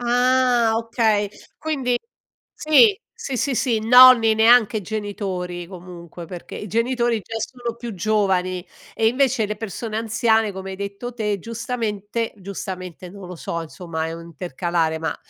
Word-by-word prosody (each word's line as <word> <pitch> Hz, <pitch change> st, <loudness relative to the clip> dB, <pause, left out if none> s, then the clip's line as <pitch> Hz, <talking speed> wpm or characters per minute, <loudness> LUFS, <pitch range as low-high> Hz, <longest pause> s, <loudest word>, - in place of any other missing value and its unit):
Ah 245 Hz, -1 st, +3 dB
okay. 225 Hz, -3 st, +1 dB, 0.3 s
Quindi 270 Hz, -6 st, -1 dB, 0.6 s
sì 380 Hz, +7 st, +5 dB, 0.2 s
sì, 275 Hz, -, -5 dB
sì, 275 Hz, +1 st, 0 dB
sì, 235 Hz, -2 st, +1 dB
nonni 235 Hz, -1 st, +8 dB
neanche 220 Hz, -1 st, +5 dB
genitori 190 Hz, -4 st, -4 dB
comunque, 175 Hz, -2 st, -10 dB
perché 175 Hz, 0 st, -9 dB
i 210 Hz, -, -6 dB
genitori 235 Hz, +2 st, 0 dB
già 225 Hz, +3 st, -7 dB
sono 240 Hz, -1 st, -5 dB
più 235 Hz, -2 st, -7 dB
giovani 185 Hz, -3 st, 0 dB, 0.3 s
e 220 Hz, -, +1 dB
invece 250 Hz, -2 st, +2 dB
le 210 Hz, -, -3 dB
persone 220 Hz, +1 st, -5 dB
anziane 220 Hz, -1 st, +2 dB
come 190 Hz, 0 st, -7 dB
hai 190 Hz, -, -6 dB
detto 200 Hz, +5 st, -6 dB
te 210 Hz, -3 st, -1 dB
giustamente, 230 Hz, 0 st, -3 dB
giustamente 185 Hz, -2 st, -7 dB
non 195 Hz, -2 st, -10 dB
lo 180 Hz, -, -8 dB
so 170 Hz, +1 st, -4 dB
insomma, 160 Hz, -1 st, -5 dB
è 165 Hz, -, -5 dB
un 165 Hz, 0 st, -8 dB
intercalare 170 Hz, -1 st, -2 dB
ma, 160 Hz, -1 st, -3 dB
215 Hz, 145 wpm, -22 LUFS, 185-235 Hz, 0.6 s, nonni